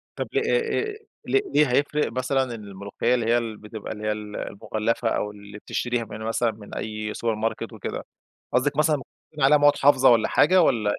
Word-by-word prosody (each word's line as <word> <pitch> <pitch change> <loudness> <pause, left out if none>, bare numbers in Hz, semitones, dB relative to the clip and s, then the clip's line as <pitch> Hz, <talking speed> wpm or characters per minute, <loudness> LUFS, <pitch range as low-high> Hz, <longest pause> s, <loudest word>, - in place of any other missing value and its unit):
طب - - -3
لي 420 - +2
إي 465 0 +1
إي 430 +1 -11 0.2
ليه 390 - +2
هيفرق 145 +1 +1
مثلًا 130 +2 0
الملوخيّة 100 +3 -2
اللي 120 -2 -1
هي 115 -2 0
بتبقى 105 0 -8
اللي 105 0 -5
هي - - +2
ال 105 -1 -6
المُغَلَّفة، 110 +3 -2
أو 105 -2 -1
اللي 100 0 -12
بتشتريها 120 +2 -2
من 110 0 -9
مثلًا 115 +1 0
من 105 -1 -11
أي 110 -1 -4
سوبر 115 -2 -1
ماركت 110 +1 -3
وكده؟ - - -5 0.5
قصدك 135 +3 +1
مثلًا 150 0 +3
ممكن 135 - -12 0.2
يكون 150 - -3
عليها 145 +3 +6
مواد 145 0 +5
حافظة 135 -2 +5
والَّا 115 -2 +4
حاجة 185 +4 +4
والَّا 110 -9 +2
115 Hz, 190 wpm, -24 LUFS, 105-145 Hz, 0.5 s, عليها